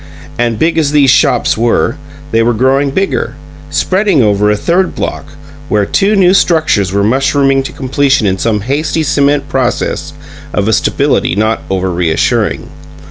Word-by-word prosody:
And 120 -2 0
big 165 +6 +1
as 150 -2 0
these 140 -3 +4
shops 145 0 +2
were, 115 +1 0 0.4
they 115 - +2
were 115 0 +1
growing 135 +4 +1
bigger, 190 +8 -2 0.3
spreading 185 - +1
over 105 -1 +2
a 105 - +1
third 180 - 0
block, - - -4 0.4
where 105 -1 +1
two 200 - +1
new 185 -2 +4
structures 155 - +1
were 100 +1 0
mushrooming 135 +4 +1
to 135 - -6
completion 135 -2 0
in 95 -1 0
some 110 -3 0
hasty 145 +7 -1
cement 140 -1 +1
process 135 +2 -2 0.4
of 100 0 0
a 110 - +2
stability 90 - 0
not 110 +2 0
over 95 -1 -1
reassuring. 85 -2 -1
135 Hz, 155 wpm, -12 LUFS, 105-145 Hz, 0.4 s, these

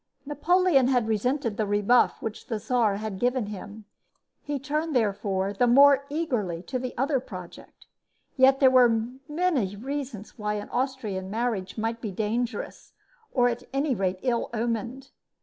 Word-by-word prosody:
Napoleon 295 -1 +3
had 245 -4 +2
resented 230 +1 -1
the 215 - 0
rebuff 205 +4 +2
which 220 -1 -6
the 225 - -2
Czar 220 -2 +1
had 210 -2 -5
given 245 -1 +1
him. 205 +1 -9 0.6
He 290 -1 -3
turned, 300 +3 -2
therefore, 200 -3 0
the 245 +5 +2
more 280 +2 +6
eagerly 240 - -2
to 255 +4 -3
the 255 0 -6
other 270 +2 +1
project. 185 -8 -11 0.5
Yet 270 0 +5
there 265 -2 +6
were 235 -3 +4 0.2
many 295 - 0
reasons 255 -2 -6
why 210 0 -1
an 205 0 -6
Austrian 240 -8 -3
marriage 220 -3 -2
might 225 +1 -2
be 215 - -3
dangerous, 220 +3 -3 0.4
or, 245 -2 +3
at 240 0 -2
any 280 0 +1
rate, 190 -4 -1
ill 240 -3 0
omened. 235 +4 -3
240 Hz, 150 wpm, -26 LUFS, 210-270 Hz, 0.6 s, more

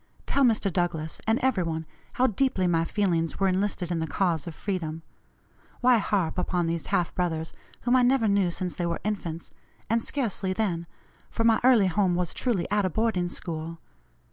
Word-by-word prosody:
Tell 280 - +2
Mr. 215 -6 +2
Douglass, 165 -3 -2
and 225 +1 +3
every 260 -8 +2
one, 160 -1 -2 0.3
how 255 - +2
deeply 235 -4 +1
my 165 -2 +2
feelings 170 -4 0
were 195 - +3
enlisted 185 -2 -1
in 170 - 0
the 160 - -2
cause 170 -1 0
of 165 - -6
freedom. 165 -5 -3 0.8
Why 245 -2 +5
harp 185 -5 0
upon 180 -1 0
these 165 -1 -2
half 175 - 0
brothers, 160 -3 -2 0.3
whom 245 +1 +2
I 255 - +5
never 250 -2 +3
knew 200 -3 +3
since 180 +1 -3
they 175 - -1
were 170 - -2
infants, 175 -6 -4 0.4
and 230 0 +3
scarcely 220 -8 -1
then, 180 -5 -1 0.4
for 230 - -2
my 225 -1 +4
early 245 -5 +6
home 185 -1 +2
was 175 -2 -1
truly 230 -9 -1
at 205 0 +2
a 185 - +1
boarding 190 -2 0
school. 165 -1 -5
185 Hz, 185 wpm, -27 LUFS, 170-220 Hz, 0.8 s, early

